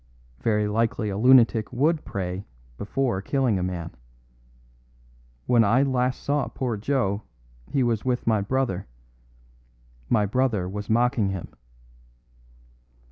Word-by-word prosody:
Very 105 -2 +1
likely 110 0 0
a 95 - -3
lunatic 120 -2 +5
would 155 +5 +1
pray 95 0 -4 0.3
before 110 - -1
killing 125 -3 +1
a - - -2
man. 85 -2 -4 1.5
When 120 -2 +4
I 115 +6 +3
last 130 -2 0
saw 145 0 0
poor 125 -4 -3
Joe 105 -3 -1 0.5
he 135 - +1
was 115 -3 0
with 125 -1 -1
my 110 -3 +2
brother. 105 -4 -1 1.2
My 105 -3 +3
brother 110 -4 0
was 105 +2 -6
mocking 120 -2 +2
him." 95 -3 -5
115 Hz, 120 wpm, -25 LUFS, 100-130 Hz, 1.5 s, lunatic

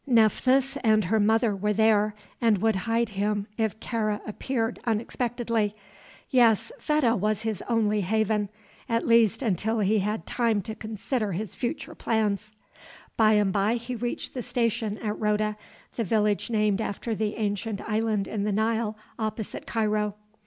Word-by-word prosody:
Nephthys 255 +3 +3
and 215 -4 +3
her 220 +5 +2
mother 220 +1 +3
were 210 +2 0
there, 215 -1 +3 0.3
and 225 -3 +4
would 220 +2 +2
hide 225 +4 0
him 205 0 -1
if 220 -1 -1
Kāra 215 -3 -1
appeared 225 +1 -2
unexpectedly. 230 -1 -1 0.6
Yes, 230 -3 +4
Fedah 300 -7 +2
was 215 +1 0
his 220 -4 -2
only 215 -3 +2
haven 210 +1 +1 0.4
at 230 0 +1
least 230 0 +4
until 220 +1 0
he 210 0 +2
had 210 +3 -2
time 230 -5 +1
to 220 - -5
consider 215 0 -3
his 200 +2 -4
future 240 - -4
plans. 215 -2 -1 0.6
By 220 -1 +5
and 205 -2 +3
by 205 +3 +2
he 240 +1 -5
reached 240 +1 -3
the 255 - -3
station 230 -3 -1
at 210 -2 -3
Roda 210 0 +1 0.4
the 230 - 0
village 210 +1 +1
named 215 -2 +1
after 220 +2 -3
the 215 0 -1
ancient 205 0 -2
island 215 -2 0
in 205 -2 -2
the 210 - 0
Nile 220 +1 0 0.2
opposite 215 -1 -4
Cairo. 210 -2 0
220 Hz, 150 wpm, -26 LUFS, 210-230 Hz, 0.6 s, By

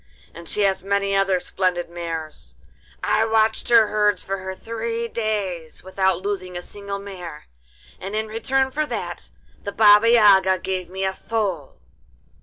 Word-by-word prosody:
And 170 0 -11
she 210 - -2
has 195 -2 +1
many 200 0 0
other 195 -1 +2
splendid 180 -1 -1
mares. 165 -2 -7 0.5
I 220 - +2
watched 220 0 +1
her 230 -2 +7
herds 210 -2 +1
for 190 -1 -4
three 230 +2 -4
days 200 -8 -3
without 190 -1 0
losing 185 -3 -3
a 175 - -6
single 200 0 -6
mare, 180 -6 -9 0.5
and 195 +3 -5
in 220 0 0
return 265 +5 0
for 305 +2 -1
that - - -5 0.3
the 200 - -4
Baba 210 +1 +6
Yaga 195 -5 +6
gave 185 -1 -4
me 190 +1 -4
a 190 0 0
foal. 195 -9 -3
195 Hz, 150 wpm, -22 LUFS, 185-215 Hz, 0.5 s, her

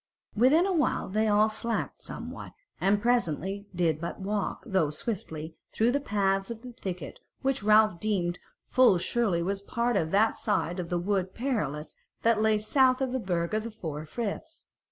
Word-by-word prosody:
Within 265 - +5
a 390 - +1
while 300 - +1
they 215 +3 +1
all 210 +1 +4
slacked 225 +1 -2
somewhat, - - -7 0.3
and 200 +1 +3
presently 200 -4 0
did 165 -3 +1
but 170 - -5
walk, 200 +1 -2
though 190 - +1
swiftly, 160 -2 -4 0.2
through 230 +2 +2
the 280 - +1
paths 195 -5 0
of 230 0 -7
the 250 -1 -9
thicket, 180 - -6 0.2
which 270 -3 +1
Ralph 215 -3 +4
deemed 180 -4 -1 0.3
full 250 -7 +5
surely 185 -2 0
was 195 +2 -1
part 235 +3 -1
of 160 -5 +1
that 210 +5 +3
side 175 +3 -1
of 170 -2 -4
the 175 - 0
Wood 190 +1 -1
Perilous 205 - -2 0.3
that 230 -2 +3
lay 220 -1 +3
south 255 +4 +3
of 265 -2 -1
the 260 - -1
Burg 175 -4 -2
of 215 - +1
the 230 - -5
Four 160 -8 -6
Friths. 240 - -5
205 Hz, 175 wpm, -28 LUFS, 175-235 Hz, 0.3 s, Within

